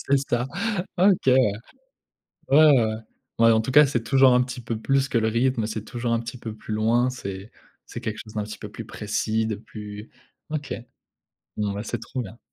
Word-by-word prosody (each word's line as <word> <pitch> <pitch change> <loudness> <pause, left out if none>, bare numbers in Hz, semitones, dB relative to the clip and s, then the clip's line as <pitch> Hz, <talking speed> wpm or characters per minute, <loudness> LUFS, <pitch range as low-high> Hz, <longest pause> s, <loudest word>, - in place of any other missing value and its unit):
C'est 140 0 +4
ça. 120 +1 0 0.5
OK 190 -3 +4
ouais. 130 -1 +6 1.2
Ouais, 140 - +7
ouais, 135 -6 +6
ouais. 110 0 -2 0.4
Ouais, 115 0 +6
en 110 0 +4
tout 120 +4 -4
cas, 150 +2 +8
c'est 125 -4 -1
toujours 135 -1 +5
un 125 - +5
petit 125 0 -7
peu 115 -1 -3
plus 135 +3 +1
que - - +1
le 110 -1 +2
rythme, 115 0 +1
c'est 110 -1 -4
toujours 120 0 -3
un 115 - +2
petit 115 +2 -7
peu 110 -2 -6
plus 110 - -7
loin, 115 +4 +2
c'est 100 -5 -7 0.3
c'est - - -8
quelque 110 - -4
chose 110 - -13
d'un 105 -2 -2
petit 105 +1 -8
peu 105 - -7
plus 115 +2 -8
précis, 110 +1 -1
de 110 - -2
plus 105 0 -9 0.4
OK. 150 -2 -3 0.8
Bon, 105 -1 -1
bah, 100 +1 -4
c'est 120 0 -4
trop 130 - -5
bien. 110 +1 -10
115 Hz, 210 wpm, -24 LUFS, 110-130 Hz, 1.2 s, cas